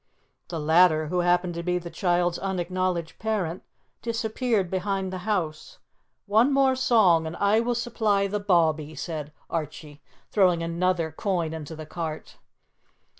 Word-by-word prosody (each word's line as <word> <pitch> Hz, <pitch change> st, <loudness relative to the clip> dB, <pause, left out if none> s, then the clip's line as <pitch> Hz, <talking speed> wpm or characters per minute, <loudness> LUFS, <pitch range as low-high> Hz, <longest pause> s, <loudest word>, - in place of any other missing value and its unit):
The 165 Hz, -, -4 dB
latter, 155 Hz, 0 st, +4 dB
who 180 Hz, -, 0 dB
happened 175 Hz, 0 st, +2 dB
to 170 Hz, -, -4 dB
be 180 Hz, +1 st, 0 dB
the 170 Hz, -1 st, -7 dB
child's 175 Hz, -1 st, +1 dB
unacknowledged 185 Hz, -2 st, -2 dB
parent, 195 Hz, -6 st, -2 dB, 0.4 s
disappeared 230 Hz, -3 st, -1 dB
behind 190 Hz, 0 st, -2 dB
the 185 Hz, -, -4 dB
house. 185 Hz, -, -2 dB, 0.5 s
"One 220 Hz, +6 st, +4 dB
more 270 Hz, -1 st, +3 dB
song, 200 Hz, -11 st, +4 dB
and 160 Hz, -, -5 dB
I 205 Hz, +3 st, +3 dB
will 240 Hz, +1 st, 0 dB
supply 220 Hz, -4 st, +1 dB
the 205 Hz, +1 st, -2 dB
bawbee," 160 Hz, -6 st, +1 dB
said 155 Hz, -3 st, -5 dB, 0.2 s
Archie, 150 Hz, -2 st, -5 dB, 0.3 s
throwing 180 Hz, -5 st, +3 dB
another 170 Hz, -1 st, 0 dB
coin 170 Hz, -1 st, -2 dB
into 160 Hz, 0 st, -7 dB
the 155 Hz, 0 st, -8 dB
cart. 160 Hz, -1 st, -6 dB
180 Hz, 140 wpm, -26 LUFS, 165-205 Hz, 0.5 s, latter